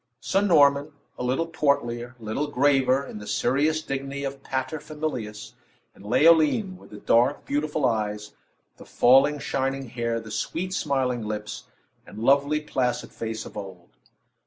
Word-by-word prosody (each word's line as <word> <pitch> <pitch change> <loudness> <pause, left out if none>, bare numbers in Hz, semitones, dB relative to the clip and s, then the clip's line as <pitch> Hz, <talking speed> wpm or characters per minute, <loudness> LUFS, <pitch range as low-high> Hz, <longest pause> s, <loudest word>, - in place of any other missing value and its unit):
Sir 195 - +1
Norman, 145 -6 +4 0.3
a - - -3
little 130 +6 0
portlier, 130 -6 -1
a - - -15
little 110 +7 -2
graver, 135 -1 +2
in 105 - -8
the 105 - -10
serious 150 +8 +1
dignity 135 +1 -4
of 135 0 -5
pater 135 +4 -3
familias; 125 -10 -5 0.4
and - - -17
Leoline, 165 - +4
with - - -16
the 105 - -10
dark, 120 +6 +2
beautiful 150 0 -1
eyes, 105 -3 -1 0.4
the - - -13
falling, 135 +4 +4
shining 135 -1 -2
hair, 115 0 -2
the 110 -1 -10
sweet 185 +10 -3
smiling 130 -7 0
lips, 105 0 -5 0.4
and - - -13
lovely, 140 +6 +3
placid 130 -5 -2
face 110 -1 -5
of - - -11
old. 95 -4 -9
135 Hz, 150 wpm, -25 LUFS, 115-150 Hz, 0.4 s, Norman